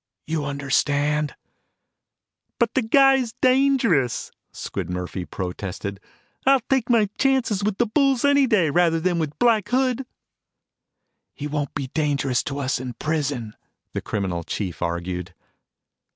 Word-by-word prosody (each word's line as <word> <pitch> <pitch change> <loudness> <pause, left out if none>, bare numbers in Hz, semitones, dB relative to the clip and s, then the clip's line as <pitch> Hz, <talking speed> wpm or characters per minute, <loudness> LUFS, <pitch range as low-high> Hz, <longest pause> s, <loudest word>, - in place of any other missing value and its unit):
You 155 -2 -2
understand?" 145 +1 0 1.2
"But 235 -2 +1
the 265 - +2
guy's 265 0 +4
dangerous," 255 - +2 0.2
Squid - - -5
Murphy 90 0 -4
protested. 95 +2 -5 0.4
"I'll 270 -1 +5
take 260 -3 +2
my 225 -3 +4
chances 260 -7 +2
with 205 -1 0
the 240 - +3
bulls 270 +3 +2
any 285 -1 +4
day, 185 -10 +3
rather 170 0 +3
than 175 0 0
with 150 -2 -3
Black 230 -4 +3
Hood." 255 0 +1 1.3
"He 145 - -6
won't 145 -2 -3
be 135 -3 -3
dangerous 140 -5 +1
to 140 - -4
us 135 -2 -1
in 125 -1 -5
prison," 140 -7 -2 0.4
the - - -2
criminal 95 -5 -2
chief 90 0 -4
argued. 90 +1 -3
155 Hz, 130 wpm, -23 LUFS, -, 1.3 s, I'll